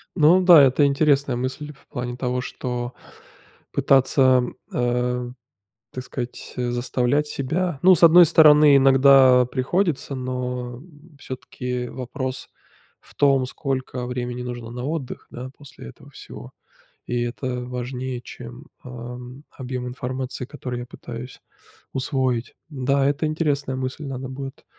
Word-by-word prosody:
Ну 170 +2 +5
да, 175 -5 +8
это 135 +2 +4
интересная 140 -2 +2
мысль, 135 +4 -4
в 135 - -26
плане 125 0 -5
того, 125 0 -2
что 125 -1 -5 0.8
пытаться, 130 -1 +4 0.3
э, 125 0 -1 0.6
так 130 - -6
сказать, 125 -2 -7
заставлять 125 +3 0
себя. 160 +4 -2
Ну, 185 +1 +7
с 170 - -1
одной 170 +1 +9
стороны 150 -3 +7
иногда 135 -1 +6
приходится, 140 +3 -1
но 125 -1 -4 0.4
всё-таки 125 -2 -5
вопрос 130 0 -5 0.5
в - - -20
том 135 -2 +3
сколько 130 -2 -4
времени 125 0 -4
нужно 120 -2 -6
на 125 +1 -6
отдых, 145 -3 -5
да, 125 +2 -8
после 140 - -12
этого - - -15
всего, - - -11 0.5
и 120 0 -2
это 125 +1 -4
важнее 125 0 -5
чем, 120 +3 -11 0.2
а, 125 - -10 0.3
м, 125 +3 -11
объем 125 -1 -6
информации 130 +1 -5
который 125 -3 -6
я 120 - -7
пытаюсь 120 +1 -9 0.5
усвоить. 130 -2 -1
Да, 140 -1 0
это 145 +2 0
интересная 145 -4 -1
мысль, 130 +3 -4
надо 130 -1 -5
будет 135 +1 -8
130 Hz, 130 wpm, -23 LUFS, 125-140 Hz, 0.8 s, одной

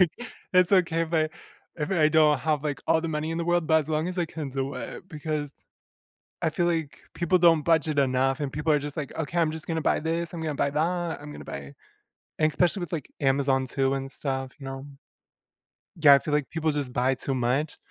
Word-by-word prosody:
Like, 180 -3 +5 0.4
it's 185 0 +4
okay 170 -4 +3
if 165 0 -5
I 155 -1 +3 0.5
if 150 -2 -3
I 160 -5 +4
don't 155 -1 +4
have, 155 -2 0
like, 145 -2 -3
all 160 - +3
the 165 - -3
money 155 0 -2
in 165 - -2
the 170 - -1
world, 175 -1 +2
but 160 0 +4
as 150 - -7
long 155 +1 0
as 180 0 -4
I 175 - +1
can 155 -3 -6
do 135 +1 -3
it. 185 - -7
Because 150 -2 -4 0.9
I 160 - +2
feel 175 +2 0
like, 165 -4 -2
people 175 +1 +2
don't 165 -3 +5
budget 155 -2 +2
enough 135 +1 +2
and 145 -2 -2
people 150 +1 0
are 150 - +3
just 145 +1 -6
like, 145 -3 -4
"Okay, 160 +2 -3
I'm 160 -2 +2
just 160 +2 -7
gonna 165 -1 -1
buy - - +2
this, 165 +2 -2
I'm 170 - -5
gonna 155 -2 -2
buy 140 - +1
that, 170 +2 -1
I'm 150 0 -9
gonna - - -9
buy" 70 0 -7 0.7
and 155 - +4
especially 180 +5 +1
with, 175 -3 -5
like, 155 -6 -4
Amazon 135 -1 +2
too 135 0 0
and 135 0 -4
stuff, 135 -2 -4
you 140 - -11
know? 135 +1 -6 1.1
Yeah, 150 -4 +7
I 140 - +6
feel 150 - -4
like 150 -2 -1
people 160 -1 0
just 145 -4 -3
buy 130 +2 +2
too 135 - -3
much, 130 +5 0
155 Hz, 230 wpm, -26 LUFS, 140-165 Hz, 1.1 s, Yeah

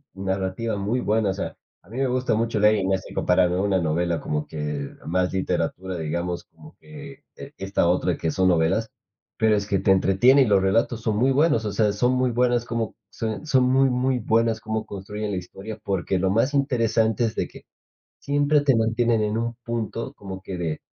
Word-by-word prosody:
narrativa 95 +3 -2
muy 105 +5 -1
buena, 110 -2 +1
o - - 0
sea, 95 - -5 0.3
a 90 - -22
mí 115 - -8
me 135 0 +1
gusta 125 -1 0
mucho 115 0 0
leer 105 +1 +5
y 100 -3 -1
no 95 0 +2
es 95 - -5
e - - -11
comparable 90 0 +2
una 95 0 +1
novela 85 +1 0
como 75 0 -3
que 75 -2 -4 0.2
más 90 +2 0
literatura, 95 0 -2
digamos, 85 +2 -3
como 155 0 -17
que 145 -2 -12
e 140 +1 -10
esta 95 -3 0
otra 90 +1 +1
que 80 - -2
son 95 +4 +2
novelas, 85 +6 +1 0.5
pero 110 -1 +3
es 100 -1 -1
que 100 -2 0
te 95 - +2
entretiene 95 +8 +5
y - - +5
los 100 -4 +3
relatos 115 +4 +1
son 110 -2 -1
muy 130 +4 +3
buenos, 135 -5 +2
o 105 - -1
sea, 105 0 +1
son 125 +5 +1
muy 130 -1 +1
buenas 120 0 +1
como 115 -2 -3
son 110 +6 -4
son 130 -4 +3
muy, 130 +1 +3
muy 125 0 0
buenas 115 0 +1
como 110 0 -3
construyen 105 +2 -5
la 95 - -2
historia, 100 +4 -8
porque 95 -2 -1
lo 95 +1 +1
más 115 +8 +1
interesante 115 -5 +1
es 110 - -3
de - - -1
que - - -15 0.5
siempre 145 +1 +2
te 140 -2 +3
mantienen 115 0 +2
en 105 +1 -1
un 115 0 -2
punto 115 +2 -4
como 95 -5 -8
que 95 -1 -6
de 80 -3 -3
110 Hz, 210 wpm, -24 LUFS, 95-120 Hz, 0.5 s, leer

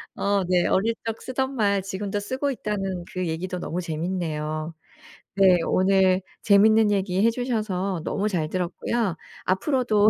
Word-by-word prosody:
어 200 -1 +1
네. 180 -1 +2
어릴 225 +4 +2
적 225 0 -4
쓰던 265 +1 -2
말 200 -4 +2
지금도 195 +1 -3
쓰고 260 +7 -2
있다는 195 -7 -3
그 185 -1 -2
얘기도 180 +3 -3
너무 175 +1 -3
재밌네요. 160 -2 -3 0.6
네. 190 -2 +6
오늘 190 0 +3 0.2
재밌는 215 +1 +5
얘기 195 -1 +1
해 230 - +5
주셔서 210 -7 -2
너무 200 +4 -1
잘 160 -6 -1
들었고요. 185 +3 -1 0.3
앞으로도 215 +1 +3
195 Hz, 290 characters per minute, -24 LUFS, 180-215 Hz, 0.6 s, 네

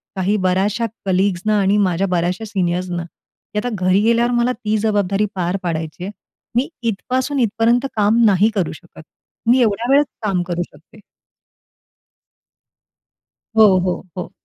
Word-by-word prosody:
काही 190 +2 +1
बऱ्याचशा 200 +5 +1 0.2
कलीग्स 190 -1 +1
ना 215 -1 +2
आणि 195 +1 +2
माझ्या 190 -1 +1
बऱ्याचशा 180 +3 -1
सीनियर्सना, 180 -3 -2
की 170 +4 -14
आता 245 - -2 0.2
घरी 185 +2 +4
गेल्यावर 235 +2 +2
मला 240 +1 +2
ती 215 -2 -2
जबाबदारी 205 -1 +1
पार 180 +1 -1
पाडायची 160 -1 -4
आहे. 195 - -4 0.4
मी 250 +3 +1 0.2
इथपासून 260 +6 -2
इथपर्यंत 235 +2 +2
काम 215 +2 +3
नाही 205 +1 +4
करू 185 -5 0
शकत. 165 +1 -14 0.5
मी 250 +2 +5
एवढ्या 230 +1 +1
वेळेत 285 +2 +5 0.2
काम 195 -4 0
करू 175 0 -3
शकते. 160 +8 -19 2.6
हो, 210 -4 +7
हो, 180 0 -2
हो. 180 - -5
200 Hz, 140 wpm, -19 LUFS, 180-225 Hz, 2.6 s, हो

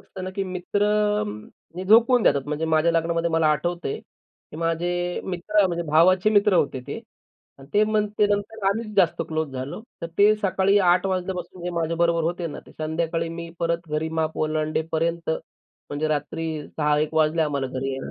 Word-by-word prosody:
असत 190 - -10
ना, 185 - -4
की 195 +1 -3
मित्र 185 +2 -1 0.9
म 180 - -5
झोकवून 230 +4 +5
देतात 140 -8 +3
म्हणजे 150 +2 -2
माझ्या 160 +1 +2
लग्नामध्ये 165 0 0
मला 160 -1 +2
आठवतंय, 160 +1 -1
की - - -19
माझे 175 +2 -1
मित्र 190 +3 +1
म्हणजे 170 -1 -2
भावाचे 185 +6 +5
मित्र 205 -1 +4
होते 140 -6 +1
ते. - - -5 0.6
आणि 135 0 -14
ते 210 - +5
मग 215 -1 +1
ते 210 - +5
नंतर 205 0 -2
आम्हीच 215 +1 -2
जास्तच 180 -4 +2
क्लोज 155 -3 -3
झालो. 130 +8 -5 0.2
तर - - -1
ते 205 +1 +6
सकाळी 195 +1 +3
8:00 180 +2 +3
वाजल्यापासून 185 -1 -3
जे 180 - -2
माझ्याबरोबर 170 0 +1
होते 175 +2 -2
ना, 150 - -7
ते - - -15
संध्याकाळी 165 +1 -2
मी 170 0 -6
परत 170 0 -1
घरी 155 +1 -1
माप 160 0 -1
ओलांडेपर्यंत 160 +2 -1
म्हणजे 155 -1 -6
रात्री 155 +2 -2 0.2
6:00 150 -1 +1
एक 155 +1 -1
वाजल्या 160 +1 +3
आम्हाला 140 -3 -1
घरी 130 +1 -3
यायला. 135 0 -5
170 Hz, 175 wpm, -24 LUFS, 155-185 Hz, 0.9 s, ते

